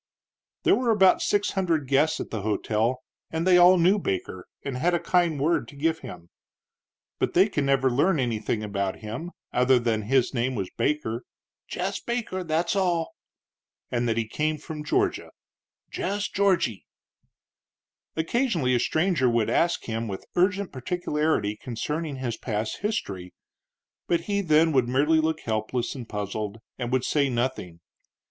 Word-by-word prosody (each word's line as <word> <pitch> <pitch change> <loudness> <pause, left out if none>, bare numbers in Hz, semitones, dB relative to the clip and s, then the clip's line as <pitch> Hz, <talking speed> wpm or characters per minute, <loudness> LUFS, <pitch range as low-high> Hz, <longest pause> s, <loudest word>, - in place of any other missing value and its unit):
There - - +5
were 235 -4 +2 0.2
six 205 0 +1
hundred 170 -7 0
guests 150 +4 +2
at - - -6
the 110 - -3
hotel, 110 +4 0 0.3
and 160 +1 -2
they 180 -1 +6
all 180 +1 +7
knew 185 +4 +4
Baker 95 - -4 0.2
and 140 -2 -3
had 175 +7 +1
a - - +1
kind 170 -5 +1
word 160 +5 +1
to 145 - -13
give 160 +3 0
him. 90 -9 -10 0.9
But - - -1
they 185 +4 +6
could 145 -9 -1
never 135 -1 +3
learn 155 +6 +2
anything 115 -3 -1
about 100 -2 -3
him 115 +11 -5 0.2
other 125 +1 +4
than 115 -2 0
that 105 - -6
his 130 0 +2
name 125 +1 0
was 95 -4 -3
Baker 130 -6 -1 0.4
"jess 190 +2 -3
Baker, 235 -6 -3
that's 165 +2 0
all" 175 -4 0 0.8
and 120 -1 0
that 115 - 0
he 115 -1 0
came 155 +6 -1
from 150 0 -7
Georgia 150 - 0 0.6
"jess 205 +2 -2
Georgy." 185 - +1 1.3
Occasionally 165 - +1
a 120 - +3
stranger 160 -1 +2
would 115 -2 +1
ask 170 +1 +1
him 115 0 -3
with 95 -2 -6
urgent 190 +2 +1
particularity 150 - -1
concerning 145 +7 -4
his 125 -3 -3
past 110 -2 -3
history, 100 - -4 0.7
but 170 -1 +2
he 200 +3 -1
then 160 -2 +4
would 130 -4 +2
merely 150 +5 +3
look 160 0 0
helpless 110 +2 -2
and 125 -4 -8
puzzled 105 +1 -4 0.2
and 120 -1 -3
would 130 -1 +1
say 140 0 +1
nothing. 120 -9 -3
140 Hz, 155 wpm, -26 LUFS, 115-170 Hz, 1.3 s, all